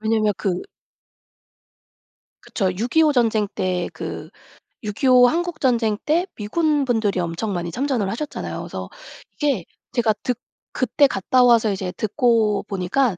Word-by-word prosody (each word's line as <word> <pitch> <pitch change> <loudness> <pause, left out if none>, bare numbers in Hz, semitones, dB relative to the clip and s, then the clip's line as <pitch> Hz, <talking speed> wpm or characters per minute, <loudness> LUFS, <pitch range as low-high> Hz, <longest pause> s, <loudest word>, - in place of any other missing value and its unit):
왜냐하면 215 -1 +2
그 185 -4 -1 1.8
그쵸. 195 -4 -1
6.25 250 - +2
전쟁 225 -4 +2
때 180 -2 -1
그 - - -6 0.5
6.25 250 +4 +4
한국전쟁 255 -9 0
때 330 +4 +2
미군 295 +7 0
분들이 220 -6 0
엄청 175 +5 -2
많이 175 -1 -3
참전을 250 - -1
하셨잖아요. 285 +8 -4
그래서 - - -6 0.4
이게 275 - -1 0.3
제가 235 -4 +2
듣 250 -2 -1 0.4
그때 265 +3 +3
갔다 250 +3 +2
와서 230 -3 +5
이제 190 -2 -3
듣고 220 -2 +1
보니까 195 +3 0
225 Hz, 245 characters per minute, -22 LUFS, 200-260 Hz, 1.8 s, 와서